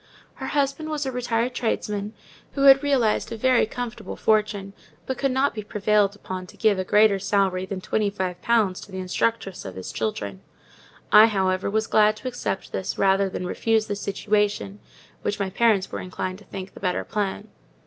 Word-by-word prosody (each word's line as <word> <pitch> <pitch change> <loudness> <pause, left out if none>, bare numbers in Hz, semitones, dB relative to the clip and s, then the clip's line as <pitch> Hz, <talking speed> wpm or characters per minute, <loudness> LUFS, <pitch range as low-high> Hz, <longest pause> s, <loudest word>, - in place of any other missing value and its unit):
Her - - -7
husband 285 +2 -1
was 300 -2 -2
a 265 - -2
retired 245 0 -1
tradesman, 210 -3 -2 0.4
who 275 - -1
had 270 -1 +8
realized 265 -8 +1
a 230 - -4
very 255 0 +3
comfortable 235 -1 -6
fortune; 210 -2 0 0.3
but 260 - -4
could 275 - +1
not 265 +2 +1
be 215 - -4
prevailed 210 -1 +1
upon 185 -2 -6
to - - -15
give 210 -3 +3
a - - 0
greater 210 0 +4
salary 190 -1 +1
than 190 -1 -5
twenty 210 +2 0
five 185 -3 -4
pounds 215 -6 +2
to - - -12
the 190 - -6
instructress 190 +1 -1
of 95 -2 -8
his 95 -1 -6
children. 100 -3 -3 0.7
I, 215 +1 +9
however, 190 -3 0
was 220 +2 0
glad 215 -1 +4
to 235 - -8
accept 245 -5 -4
this, 190 - -3
rather 195 0 +3
than 185 - -4
refuse 220 +4 +1
the 205 - -3
situation—which 205 0 -3
my 195 -2 -2
parents 215 -2 +2
were - - -4
inclined 185 +1 -5
to 210 - -17
think 190 -1 -8
the - - -12
better 180 -2 -1
plan. 205 -3 -3
210 Hz, 185 wpm, -24 LUFS, 190-230 Hz, 0.7 s, I